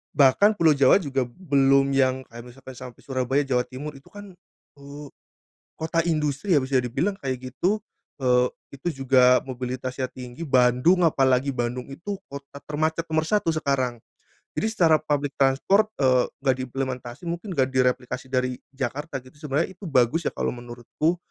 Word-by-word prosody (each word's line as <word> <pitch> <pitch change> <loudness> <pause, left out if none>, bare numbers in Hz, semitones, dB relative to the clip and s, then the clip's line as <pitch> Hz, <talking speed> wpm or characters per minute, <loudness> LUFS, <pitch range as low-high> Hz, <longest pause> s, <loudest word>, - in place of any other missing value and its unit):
Bahkan 150 +10 +5
Pulau 165 -5 +4
Jawa 135 -2 +5
juga 135 -5 -1
belum 140 -1 +2
yang 130 -1 +2
kayak 120 0 -9
misalkan 130 +1 -12
sampai 125 -2 -10
Surabaya, 135 +1 0
Jawa 125 -3 +1
Timur 135 +4 -7
itu 135 - -19
kan, 205 -1 -11 0.5
eee, 140 +1 -10 0.7
kota 160 +1 0
industri 155 +3 0
habis 135 -3 +1
ya 135 - +3
dibilang 130 - -1
kayak 130 -1 -4
gitu 190 +11 0 0.9
itu, 140 +5 -5
eee, - - -7
juga 130 -1 +4
mobilitasnya 130 0 -4
tinggi. 125 +4 -9
Bandung, 130 +7 +4
apalagi 135 -3 +2
Bandung 125 0 -3
itu 190 +8 -6
kota 140 0 -9
termacet 155 +2 -1
nomor 155 0 +1
1 205 -2 +1
sekarang, 135 -5 -1 0.6
jadi - - 0
secara 175 -8 +4
public 145 -2 -1
transport, 150 +11 +3
eee, 130 -2 +4 0.2
gak 135 -2 +2
diimplementasi, 130 +1 -5
mungkin 175 +3 -4
gak 130 -1 +3
direplikasi 130 0 0
dari 125 -1 0 0.2
Jakarta 135 +3 -4 0.2
sebenernya 150 +1 -2
itu 190 +2 -12
bagus 135 +5 +2
ya - - -22
kalo - - -1
menurutku, 120 +7 -3
135 Hz, 150 wpm, -24 LUFS, 130-155 Hz, 0.9 s, Bahkan